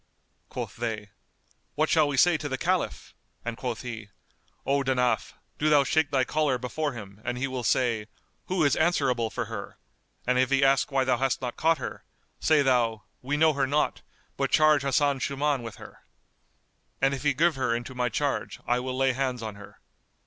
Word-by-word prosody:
Quoth - - -6
they, 110 -3 -4 0.6
"What 155 +1 +2
shall 155 -2 +4
we 145 -1 -2
say 175 +5 +5
to 150 -1 -3
the 130 - -2
Caliph?"; - - -1 0.3
and 120 -1 -3
quoth 120 -1 -4
he, 110 -4 -7 0.6
"O 140 +1 +2
Danaf, 125 -2 0 0.3
do 155 - +2
thou 145 -2 +6
shake 160 +1 +1
thy 135 -2 +2
collar 150 -1 +1
before 140 +4 -3
him, 100 -3 -10
and 125 - -3
he 130 +2 -1
will 130 -2 -4
say, 115 -2 +1 0.4
'Who 185 -3 +1
is 145 - +3
answerable 135 -9 +1
for - - -3
her'; - - -7 0.5
and 125 0 +2
if 130 0 +3
he 135 0 +3
ask 135 0 +3
why 135 -1 +2
thou 130 -1 +2
hast 135 +1 0
not 125 -2 -4
caught 165 0 +2
her; 130 - -6 0.4
say 155 -2 +4
thou, 120 -5 +1 0.2
'We 145 +3 -1
know 160 0 +4
her 135 -1 0
not; 150 +2 0 0.4
but - - 0
charge 155 -2 +5
Hasan 140 0 +1
Shuman 140 0 0
with 115 -3 -7
her.' - - -13 1.0
And 135 +1 +2
if 135 - -4
he 145 -2 +1
give 165 +4 +3
her 130 -3 0
into 120 +2 -5
my 125 -1 0
charge, 140 +4 -2
I 120 +1 +1
will 130 0 -4
lay 135 -1 +2
hands 130 -2 -2
on 110 -1 -4
her." 100 0 -14
130 Hz, 195 wpm, -27 LUFS, 120-145 Hz, 1.0 s, thou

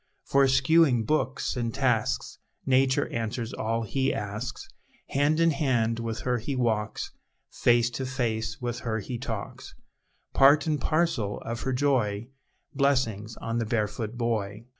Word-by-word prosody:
For, 140 0 +3
eschewing 135 -1 +4
books 135 0 0
and 120 -2 -1
tasks, 125 -2 0 0.3
Nature 130 0 +3
answers 115 +1 -3
all 115 +1 -1
he 135 +5 0
asks; 105 +4 -5 0.4
Hand 145 +3 +2
in 165 0 +4
hand 120 -6 +1
with 115 -1 -4
her 125 -1 0
he 135 +5 -3
walks, 110 -4 -1 0.4
Face 120 0 +3
to 130 +1 -4
face 115 -4 -2
with 120 0 -3
her 115 -3 -2
he 115 +3 -5
talks, 115 -5 -6 0.6
Part 140 +2 +6
and 150 -3 0
parcel 155 -11 0
of 115 0 -5
her 135 - -1
joy, 120 -5 0 0.4
Blessings 120 -6 0
on 115 +1 -2
the 115 - -1
barefoot 110 +1 -2
boy! 110 -2 -2
120 Hz, 140 wpm, -27 LUFS, 115-135 Hz, 0.6 s, Part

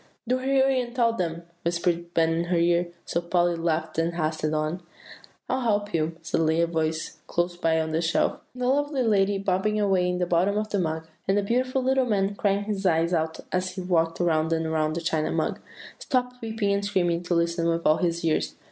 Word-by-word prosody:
"Do 255 +2 +1
hurry, 265 0 +2
and 240 0 -7
tell 235 -2 +3
them," 170 -5 -3 0.2
whispered 170 0 -1
Ben 165 0 +3
in 165 +1 0
her 175 0 0
ear; 170 +1 +2 0.2
so 170 - -1
Polly 175 0 +1
laughed 165 -1 -1
and 165 +1 0
hastened 155 -1 -1
on. 155 +4 -1 0.7
"'I'll 260 +1 0
help 205 -3 0
you,' 165 0 -1
suddenly 160 0 +1
said 170 0 +2
a - - -10
voice 160 -1 -2
close 175 0 -1
by 165 -2 +1
on 160 0 -2
the 160 +1 0
shelf. 165 -1 +1 0.2
The 250 0 -3
lovely 285 0 +1
lady 200 -3 +2
bobbing 195 +2 0
away 190 -3 +2
in 180 - -1
the 180 - 0
very 175 +1 +2
bottom 200 +1 0
of 215 0 -1
the 205 - 0
mug, 160 -2 -2 0.2
and 195 +1 +3
the 205 - +2
beautiful 255 +4 0
little 265 0 +2
man 200 -2 +1
crying 200 0 0
his 205 -2 -3
eyes 170 -1 +2
out 160 -1 -1
as 185 0 -1
he 190 - -4
walked 165 -2 +1
around 160 -2 +1
and 165 0 0
around 155 -1 0
the 170 - -2
China 160 -2 0
Mug, - - -1 0.4
stopped 250 -2 -1
weeping 220 -3 -1
and 200 0 0
screaming 175 -4 +1
to 175 0 -1
listen 170 0 +1
with 165 0 -1
all 155 - +5
their 175 - +2
ears. 160 -2 0
175 Hz, 220 wpm, -26 LUFS, 165-205 Hz, 0.7 s, all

